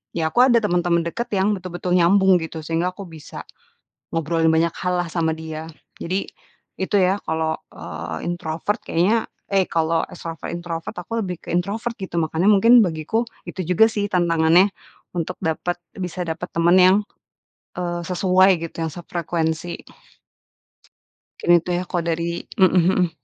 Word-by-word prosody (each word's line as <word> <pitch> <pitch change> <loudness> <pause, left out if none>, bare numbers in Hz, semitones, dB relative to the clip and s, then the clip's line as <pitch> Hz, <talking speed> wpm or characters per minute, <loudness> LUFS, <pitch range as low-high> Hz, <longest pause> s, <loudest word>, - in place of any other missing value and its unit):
ya 165 -1 0
aku 245 - +5
ada 240 -2 +5
teman-teman 175 -3 +2
dekat, 235 +8 -4
yang 195 +2 +2
betul-betul 180 0 -3
nyambung, 190 +2 +5
gitu. 160 0 -6
Sehingga, 165 +3 0
aku 200 - -8
bisa 160 -2 -10 0.7
ngobrolin 165 0 +1
banyak 165 +1 +2
hallah 180 -1 -1
sama 160 -2 0
dia, 160 0 -7 0.3
jadi, 185 +3 -2 0.5
itu 190 +2 -1
ya 190 +2 +2
kalau, 160 0 -1 0.2
eee, 80 0 -6
introvert 175 +3 -2
kayaknya, 205 +7 +1 0.2
eh, 195 -2 +3
kalau 165 0 +1
ekstrovert, 165 -3 -7
introvert 170 -1 -5
aku 225 +6 -3
lebih 180 -2 -4
ke - - -10
introvert 205 +7 -1
gitu. 185 -2 -4
Makanya 160 +3 0
mungkin 230 +4 +7
bagiku, 165 +6 -1 0.3
itu 190 - -5
juga 180 +5 +5
sih 205 -2 -1
tantangannya 170 +1 +4 0.5
untuk 175 +1 -3
dapat 160 +2 -2 0.2
bisa 180 -1 -4
dapat 165 +2 -4
teman, 170 +1 +3
yang, 185 +2 +6 0.8
eee, 175 -1 -2
sesuai 185 0 +3
gitu, 165 - -6
yang 160 -1 -2
sefrekuensi. 170 -1 -3 1.6
Mungkin 175 0 +5
itu 170 +1 -2
ya, 175 0 -2
kalau 175 -2 -1
dari 170 0 -2 0.2
mhm 185 - +7
mhm. 180 0 +3
175 Hz, 150 wpm, -22 LUFS, 165-185 Hz, 1.6 s, mungkin